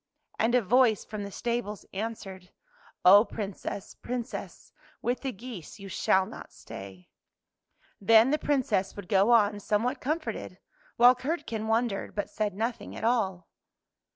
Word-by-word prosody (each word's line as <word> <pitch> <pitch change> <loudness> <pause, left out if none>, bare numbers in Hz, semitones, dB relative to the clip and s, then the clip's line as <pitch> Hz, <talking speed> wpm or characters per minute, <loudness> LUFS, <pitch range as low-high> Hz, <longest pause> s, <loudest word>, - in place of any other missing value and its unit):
" - - -35
And 230 +3 +3
a 245 - +3
voice 230 0 +3
from 210 -1 -6
the 200 - -5
stables 235 -2 -3
answered, 195 -3 -6 0.3
" - - -29
Oh, 200 +3 +9
Princess, 200 -3 -6
Princess, 245 0 -6 0.3
with 245 +1 -1
the 270 - -2
geese 220 -7 -9
you 195 -1 -9
shall 190 +1 +2
not - - -10
stay." 95 -2 -11 0.9
Then 225 +5 +6
the 305 - +2
Princess 255 -9 0
would 200 -3 -8
go 200 +1 +3
on 210 -3 +4
somewhat 215 +5 0
comforted, 310 +4 -3 0.4
while 245 +1 +8
Curdken 255 -5 -3
wondered, 225 -2 0
but 205 - -3
said 210 -3 -2
nothing 225 0 -3
at - - -7
all. 205 -6 0
220 Hz, 150 wpm, -28 LUFS, 195-245 Hz, 0.9 s, Oh